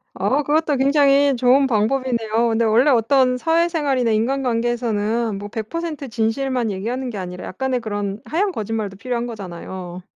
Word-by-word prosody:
어 290 +3 +1
그것도 300 0 +1
굉장히 280 0 +4
좋은 260 +3 +4
방법이네요. 230 0 +1
근데 230 +1 +1
원래 235 +7 +4
어떤 255 +1 +3
사회생활이나 320 -6 +1
인간관계에서는 230 -3 0
뭐 205 +1 -7
100% 285 +7 -5
진실만 235 +1 -1
얘기하는 240 +7 -3
게 205 - -6
아니라 180 0 -6
약간의 255 +5 -2
그런 205 -2 -4
하얀 355 - 0
거짓말도 215 - -4
필요한 240 +2 -3
거잖아요. 185 -4 -7
240 Hz, 370 characters per minute, -21 LUFS, 215-270 Hz, -, 굉장히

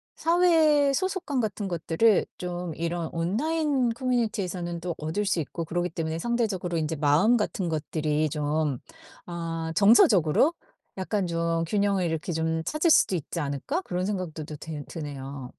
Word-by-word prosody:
사회 320 -5 +4
소속감 370 -5 -1
같은 205 -2 -3
것들을 175 +5 +2
좀 175 -2 -4
이런 170 0 -2
온라인 260 - 0
커뮤니티에서는 210 -9 -2
또 175 -1 -3
얻을 160 +7 -2
수 190 -3 +1
있고 165 +3 -5
그러기 175 +2 -1
때문에 160 0 -3
상대적으로 205 -7 -1
이제 160 +1 -2
마음 155 +11 +4
같은 190 -4 -2
것들이 155 -1 -1
좀 150 -2 -1 0.5
아 165 -1 -4
정서적으로 205 - +5 0.4
약간 190 +1 -1
좀 165 0 0
균형을 200 -1 +1
이렇게 160 +1 -2
좀 160 0 -1
찾을 310 +2 +2
수도 190 - +5
있지 165 +1 -4
않을까 145 - -2
그런 180 +1 -2
생각도 180 -6 -3
또 150 - -7
되 150 -2 -7
드네요. 140 -4 -7
175 Hz, 325 characters per minute, -26 LUFS, 160-220 Hz, 0.5 s, 정서적으로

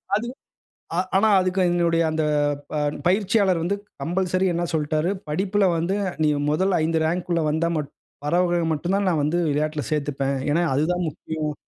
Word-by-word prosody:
அதுவும், 240 +5 -3 0.6
அ - - 0 0.2
ஆனா 220 +3 +4
அதுக்கு 185 +1 0
எங்களுடைய 170 -1 +2
அந்த 155 0 -1 0.5
ப - - -4 0.3
பயிற்சியாளர் 195 -1 +2
வந்து 195 +4 0 0.3
கம்பல்சரி 185 +4 0
என்ன 170 +1 0
சொல்ட்டாரு, 155 +2 0 0.2
படிப்பில 195 +6 +1
வந்து 175 +4 0 0.3
நீ 155 - +4 0.2
மொதல் 190 +6 +1
ஐந்து 160 +1 +1
ரேங்க் 175 +3 -1
உள்ளே 170 -1 +1
வந்தா 160 +2 +1
மட் 150 -2 -3 0.4
வரவங்கள 175 +2 +2
மட்டும் 170 +5 -1
தான், 200 0 0
நான் 160 -5 +1
வந்து 160 +4 0
விளையாட்டில 150 +1 -1
சேத்துப்பேன். 140 -2 -1
ஏன்னா, 170 +4 +2
அதுதான் 175 +5 0
முக்கியம். 155 0 -4
170 Hz, 160 wpm, -23 LUFS, 155-185 Hz, 0.6 s, ஆனா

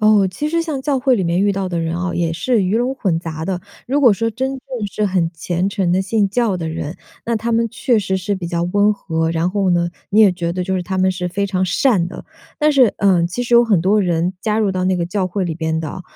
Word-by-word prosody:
哦， 215 -2 +5
其 290 +12 -3
实 335 +1 0
像 310 -5 -3
教 275 -1 0
会 260 0 +3
里 200 - 0
面 170 +1 +1
遇 200 0 +2
到 195 -1 -2
的 175 -2 -2
人 165 0 -2
哦， 180 0 -2
也 170 -1 -1
是 220 +4 +1
鱼 190 +4 +1
龙 245 +3 0
混 180 -10 -1
杂 160 -2 -5
的。 180 0 -2 0.3
如 280 +4 +1
果 245 -6 +6
说 230 +3 -1
真 260 +4 -2
正 260 -5 -5
是 210 - 0
很 180 -4 0
虔 175 +3 -2
诚 195 -4 0
的 185 +2 +2
信 205 +1 +1
教 215 -1 0
的 165 -2 -4
人， 160 +1 -5 0.3
那 235 -1 0
他 230 +2 -2
们 230 0 +2
确 240 0 +1
实 190 -1 -1
是 190 +2 -2
比 180 -3 -5
较 170 -1 -1
温 205 +4 +2
和， 160 -5 -2
然 165 +1 0
后 195 -1 0
呢， 170 0 +2 0.2
你 210 - +2
也 205 -4 +6
觉 170 -1 -3
得 180 0 -2
就 190 +1 -1
是 185 - -1
他 190 +1 -3
们 185 0 +3
是 180 -1 -3
非 200 +3 -1
常 185 -1 0
善 180 -1 +2
的。 - - -9 0.3
但 300 -1 +3
是， 255 -6 +5
呃， 185 -4 +3
其 245 +8 -3
实 240 - +1
有 235 0 +7
很 210 -7 +2
多 200 +5 +3
人， 175 +1 0
加 215 +1 0
入 205 -3 +1
到 185 0 -1
那 185 0 +1
个 170 - -1
教 185 +2 -1
会 185 +1 -2
里 170 -2 -3
边 160 0 -2
的 160 -1 -4
哦， 185 - -7
190 Hz, 295 characters per minute, -18 LUFS, 175-220 Hz, 0.3 s, 有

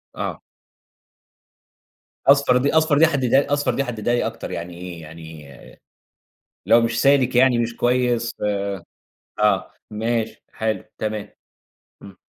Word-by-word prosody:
آه. - - -4 1.9
أصفر 140 -2 +5
دي 140 +4 +1
أصفر 160 -2 +3
دي 165 +3 +6
حدِّدها 140 -1 +1
أصفر 145 0 +1
دي 140 - 0
حدِّدها 120 -2 -2
لي 120 - +1
أكتر - - -5
يعني 85 +1 -6
إيه؟ 90 -1 -8
يعني 80 -1 -11 1.2
لو 115 - +5
مش 115 0 0
سالِك 135 -3 +3
يعني 125 -1 +5
مش 115 0 -1
كويس 120 -1 +1 1.1
آه، - - +2 0.2
ماشي، 115 +1 -2
حلو، 110 -3 -2
تمام. 110 -1 -4 0.7
إمم. 100 -1 -13
120 Hz, 120 wpm, -21 LUFS, 110-135 Hz, 1.9 s, دي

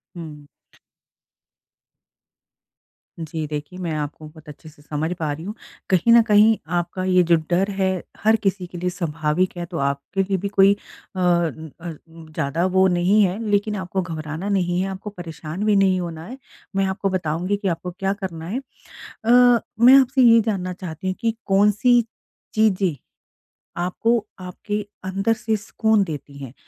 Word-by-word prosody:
हुँ। 155 -4 -9 2.7
जी। 160 -1 -4
देखिए, 150 +4 -6
मैं 175 -3 -3
आपको 150 +1 -5
बहुत 155 0 -15
अच्छे 155 +2 -12
से 150 -1 -20
समझ 150 +2 -3
पा 155 -2 -1
रही 150 +3 -6
हूँ। 205 - -4 0.4
कहीं 190 +5 +4
न 235 - +8
कहीं 210 +1 +6 0.2
आपका 175 +2 -3
ये 185 -1 +4
जो - - +8
डर 185 +3 +2
है, 190 -1 +2 0.3
हर 220 +1 +5
किसी 190 -2 0
के 175 - -9
लिए 180 +1 -1
स्वाभाविक 170 0 -1
है, 175 - -3
तो 170 -1 -7
आपके 140 +8 -2
लिए 195 0 -1
भी 195 +2 -3
कोई 195 0 +5
अन 175 -5 -2
अ, 170 0 -5 0.2
ज़्यादा 160 0 -3
वो 190 0 +3
नहीं 180 +4 +3
है, 185 0 0
लेकिन 205 +1 +1
आपको 190 0 -2
घबराना 160 +1 -5
नहीं 180 -3 +1
है, 190 - -1
आपको 195 +2 -6
परेशान 170 -1 -7
भी 210 -1 +3
नहीं 190 -2 +3
होना 165 -2 -5
है। 250 +6 -9 0.4
मैं 195 0 +2
आपको 190 +1 -1
बताऊँगी 180 +2 -1
कि 200 - -3
आपको 180 0 -2
क्या 195 +2 -2
करना 165 -4 -5
है। 225 +8 -2 0.7
अ, 245 0 +6 0.2
मैं 250 +3 +8
आपसे 260 0 +2
ये 230 -1 +7
जानना 185 -4 -1
चाहती 180 -1 -7
हूँ 185 - 0
कि 230 -2 0
कौन-सी 210 +5 +4 0.5
चीज़ें 195 -5 +2 0.9
आपको, 220 +5 0
आपके 195 +3 -4 0.2
अंदर 195 +4 0
से 220 0 -1
सुकून 220 0 +1
देती 145 -5 -7
हैं, 130 -2 -9
185 Hz, 165 wpm, -22 LUFS, 165-205 Hz, 2.7 s, न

